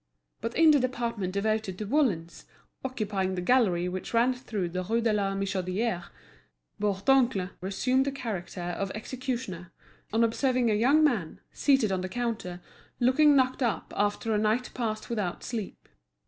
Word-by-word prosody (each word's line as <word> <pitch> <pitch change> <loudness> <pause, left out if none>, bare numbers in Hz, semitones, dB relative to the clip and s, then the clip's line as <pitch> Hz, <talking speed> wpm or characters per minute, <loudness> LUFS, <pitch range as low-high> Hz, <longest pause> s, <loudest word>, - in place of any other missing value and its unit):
But 230 +2 -3
in 325 -1 +7
the 290 - +5
department 235 -7 -2
devoted 215 -1 -1
to 215 - -4
woollens, 200 - 0 0.4
occupying 205 -7 -2
the - - -2
gallery 180 -5 +3
which 185 +5 -4
ran 240 +3 +4
through 215 -8 -4
to - - -14
the 185 0 -1
Rue 225 +5 0
de 225 -2 +1
la 200 -2 0
Michodière, 195 0 -1 0.8
Bourdoncle 205 0 +2
resumed 255 +8 +1
the 280 - -1
character 215 -9 -5
of 175 +3 -3
executioner, 235 -7 -5 0.4
on 225 +2 +3
observing 245 0 +2
a - - +3
young 265 +9 +4
man, 220 - +1
seated 270 -8 +2
on 185 -1 0
the 185 - -4
counter, 220 -6 -3 0.4
looking 280 +4 +5
knocked 260 0 +2
up 235 -4 -1
after 205 +2 0
a 210 - +2
night 220 +4 +1
passed 220 -3 -3
without 210 -7 -3
sleep. 220 -5 -6
220 Hz, 160 wpm, -28 LUFS, 190-255 Hz, 0.8 s, in